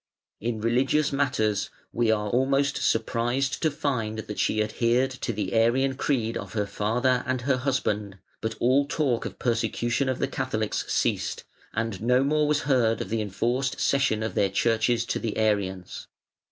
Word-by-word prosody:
In 115 Hz, 0 st, -2 dB
religious 135 Hz, +6 st, +2 dB
matters 110 Hz, -7 st, 0 dB, 0.2 s
we 120 Hz, -1 st, +1 dB
are 105 Hz, -2 st, +1 dB
almost 135 Hz, +3 st, +2 dB
surprised 120 Hz, +4 st, 0 dB
to 160 Hz, -, +3 dB
find 130 Hz, -8 st, -2 dB
that 105 Hz, -1 st, -6 dB
she 110 Hz, 0 st, +2 dB
adhered 120 Hz, +4 st, +1 dB
to 130 Hz, -2 st, -3 dB
the 105 Hz, -3 st, -3 dB
Arian 120 Hz, +4 st, +3 dB
creed 125 Hz, -4 st, -1 dB
of -, -, -7 dB
her 105 Hz, -2 st, 0 dB
father 120 Hz, +5 st, 0 dB
and 130 Hz, -1 st, 0 dB
her 130 Hz, +1 st, +1 dB
husband, 105 Hz, -7 st, -1 dB, 0.2 s
but 110 Hz, 0 st, -2 dB
all 135 Hz, +3 st, +3 dB
talk 140 Hz, -7 st, 0 dB
of -, -, -6 dB
persecution 120 Hz, +2 st, 0 dB
of 130 Hz, -, -1 dB
the 135 Hz, -, 0 dB
Catholics 130 Hz, -6 st, -2 dB
ceased, -, -, 0 dB, 0.3 s
and 110 Hz, -3 st, -3 dB
no 125 Hz, +3 st, +3 dB
more 150 Hz, +1 st, +2 dB
was 150 Hz, 0 st, +2 dB
heard 120 Hz, -5 st, +2 dB
of -, -, -4 dB
the 115 Hz, 0 st, 0 dB
enforced 120 Hz, +6 st, -1 dB
cession 130 Hz, -6 st, +2 dB
of 110 Hz, -, -3 dB
their 100 Hz, -2 st, +2 dB
churches 115 Hz, +3 st, +1 dB
to -, -, -2 dB
the 110 Hz, -2 st, -3 dB
Arians. 100 Hz, -4 st, -1 dB
120 Hz, 165 wpm, -26 LUFS, 110-130 Hz, 0.3 s, to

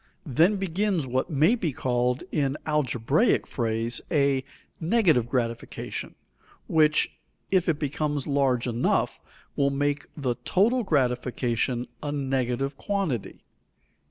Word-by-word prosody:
Then 165 Hz, -, +3 dB
begins 190 Hz, -3 st, 0 dB
what 130 Hz, +5 st, -1 dB
may 155 Hz, -, +4 dB
be 185 Hz, -10 st, -1 dB
called 125 Hz, 0 st, 0 dB
in 140 Hz, -2 st, 0 dB
algebraic 130 Hz, -7 st, +2 dB
phrase 115 Hz, 0 st, -1 dB
a 140 Hz, -4 st, +2 dB, 0.4 s
"negative 160 Hz, -, +3 dB
gratification" 115 Hz, -3 st, -3 dB, 0.5 s
which, 155 Hz, -1 st, +3 dB, 0.4 s
if 185 Hz, -2 st, +3 dB
it 155 Hz, -, +2 dB
becomes 145 Hz, -1 st, -2 dB
large 135 Hz, -4 st, +1 dB
enough, 120 Hz, -1 st, 0 dB, 0.3 s
will 140 Hz, -1 st, +2 dB
make 145 Hz, +1 st, -1 dB
the 130 Hz, -5 st, -1 dB
total 235 Hz, +7 st, +3 dB
gratification 125 Hz, -, 0 dB
a 145 Hz, -, -3 dB
negative 135 Hz, -1 st, -1 dB
quantity. 190 Hz, -, -2 dB
140 Hz, 110 wpm, -26 LUFS, 125-160 Hz, 0.5 s, may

